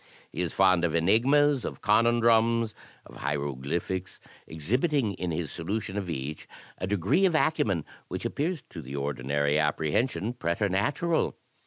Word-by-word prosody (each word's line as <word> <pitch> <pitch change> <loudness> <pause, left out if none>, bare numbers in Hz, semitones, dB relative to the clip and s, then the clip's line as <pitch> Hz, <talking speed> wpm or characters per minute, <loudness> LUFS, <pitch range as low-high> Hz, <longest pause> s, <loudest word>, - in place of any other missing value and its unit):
He - - -3
is 90 - -1
fond 95 -3 +3
of 85 -2 +1
enigmas, 130 - +3
of - - -6
conundrums, 115 0 +3 0.3
of - - -13
hieroglyphics; 75 +6 -3 0.3
exhibiting 115 - 0
in 90 -1 -4
his 80 -3 -3
solution 95 +4 -3
of 100 -3 -3
each 75 -1 -5 0.3
a 95 - -2
degree 100 - +2
of 170 - 0
acumen 110 - +1 0.2
which - - -5
appears 160 0 -2
to - - -7
the 65 +2 -8
ordinary 70 +1 0
apprehension 80 - 0
preternatural. 105 - 0
95 Hz, 135 wpm, -28 LUFS, 80-120 Hz, 0.3 s, fond